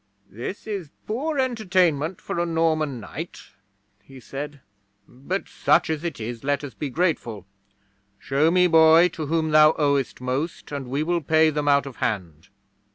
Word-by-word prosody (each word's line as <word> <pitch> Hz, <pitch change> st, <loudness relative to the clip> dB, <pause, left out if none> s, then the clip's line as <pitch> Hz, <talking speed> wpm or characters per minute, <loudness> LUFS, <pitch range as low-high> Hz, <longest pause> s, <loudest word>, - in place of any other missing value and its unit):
'"This 120 Hz, -, -6 dB
is 200 Hz, -8 st, -5 dB, 0.2 s
poor 280 Hz, +8 st, -2 dB
entertainment 185 Hz, -, +1 dB
for -, -, -4 dB
a 175 Hz, -, +1 dB
Norman 155 Hz, -5 st, 0 dB
knight," 160 Hz, +9 st, -8 dB, 0.6 s
he 135 Hz, +6 st, -14 dB
said, 145 Hz, +5 st, -7 dB, 0.5 s
"but, 155 Hz, +10 st, -5 dB
such 165 Hz, -1 st, +2 dB
as 155 Hz, 0 st, -3 dB
it 170 Hz, -7 st, -4 dB
is, 115 Hz, +2 st, -6 dB
let 145 Hz, +1 st, 0 dB
us 140 Hz, -4 st, -7 dB
be 145 Hz, +6 st, -4 dB
grateful. 125 Hz, -, -1 dB, 0.7 s
Show 140 Hz, +9 st, +1 dB
me, 180 Hz, +1 st, +4 dB
boy, 165 Hz, +1 st, +6 dB
to 160 Hz, -4 st, -6 dB
whom 160 Hz, 0 st, 0 dB
thou 155 Hz, 0 st, +7 dB
owest 140 Hz, -3 st, 0 dB
most, 135 Hz, +8 st, -3 dB
and 140 Hz, -3 st, -5 dB
we 140 Hz, +4 st, -1 dB
will 170 Hz, +1 st, 0 dB
pay 160 Hz, +1 st, +3 dB
them 150 Hz, -1 st, -2 dB
out 140 Hz, -1 st, +4 dB
of 135 Hz, -4 st, -9 dB
hand."' 85 Hz, -6 st, -3 dB
155 Hz, 160 wpm, -24 LUFS, 135-170 Hz, 0.7 s, thou